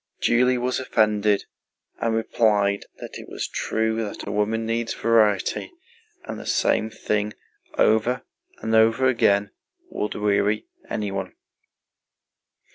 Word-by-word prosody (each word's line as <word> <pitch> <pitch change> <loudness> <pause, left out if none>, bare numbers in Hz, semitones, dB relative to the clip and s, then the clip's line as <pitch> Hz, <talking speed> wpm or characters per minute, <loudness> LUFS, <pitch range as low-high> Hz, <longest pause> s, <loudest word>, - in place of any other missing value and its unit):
Julie 125 +1 +3
was 125 +1 -1
offended 105 -4 +2 0.5
and 115 -1 0
replied 105 -3 +1
that - - -9
it - - -11
was - - -4
true 110 0 -1
that 105 - -6
a - - -2
woman 110 +2 0
needs 115 0 -1
variety, 110 - +2 0.5
and - - -6
the - - -9
same 110 - +2
thing 105 -1 -2 0.4
over 120 +3 +3 0.4
and 110 - -1
over 115 +3 +4
again 100 -6 +3 0.4
would 105 - -3
weary 105 0 +1 0.2
anyone. 100 -3 -3
110 Hz, 120 wpm, -24 LUFS, 105-115 Hz, 0.5 s, over